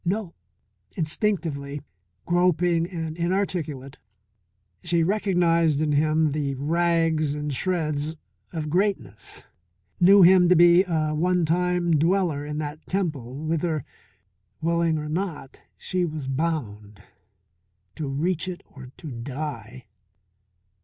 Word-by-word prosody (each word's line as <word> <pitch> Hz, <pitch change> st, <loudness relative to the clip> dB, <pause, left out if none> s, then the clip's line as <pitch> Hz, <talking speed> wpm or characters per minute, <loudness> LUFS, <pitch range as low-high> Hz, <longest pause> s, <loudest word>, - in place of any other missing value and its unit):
No. 190 Hz, 0 st, -2 dB, 0.6 s
Instinctively, 155 Hz, -5 st, -1 dB, 0.5 s
groping 175 Hz, -1 st, +2 dB
and 160 Hz, -4 st, -5 dB
inarticulate, 170 Hz, -6 st, -2 dB, 0.8 s
she 170 Hz, -1 st, +2 dB
recognized 170 Hz, -5 st, +2 dB
in 155 Hz, -1 st, 0 dB
him 155 Hz, +1 st, +2 dB
the 140 Hz, -2 st, -2 dB
rags 165 Hz, 0 st, +1 dB
and 150 Hz, -1 st, -3 dB
shreds 155 Hz, -2 st, -1 dB, 0.4 s
of 155 Hz, -2 st, -4 dB
greatness, 165 Hz, -, -2 dB, 0.6 s
knew 195 Hz, +2 st, +7 dB
him 180 Hz, 0 st, +6 dB
to 180 Hz, -, +6 dB
be 175 Hz, +2 st, +6 dB
a 155 Hz, -3 st, 0 dB
one 175 Hz, +2 st, +1 dB
time 175 Hz, +1 st, +1 dB
dweller 170 Hz, -3 st, +1 dB
in 150 Hz, 0 st, -5 dB
that 150 Hz, 0 st, -5 dB
temple 150 Hz, -7 st, -3 dB
whither, 160 Hz, -2 st, -1 dB, 0.7 s
willing 165 Hz, 0 st, +1 dB
or 150 Hz, 0 st, -4 dB
not, 160 Hz, -4 st, -4 dB, 0.2 s
she 185 Hz, -1 st, -2 dB
was 155 Hz, -5 st, -4 dB
bound, 110 Hz, -, -3 dB, 0.9 s
to 155 Hz, -, -5 dB
reach 165 Hz, +6 st, -1 dB
it 180 Hz, -1 st, -6 dB
or 130 Hz, -2 st, -12 dB
to 155 Hz, -, -8 dB
die. 125 Hz, -1 st, -6 dB
160 Hz, 110 wpm, -24 LUFS, 145-175 Hz, 0.9 s, knew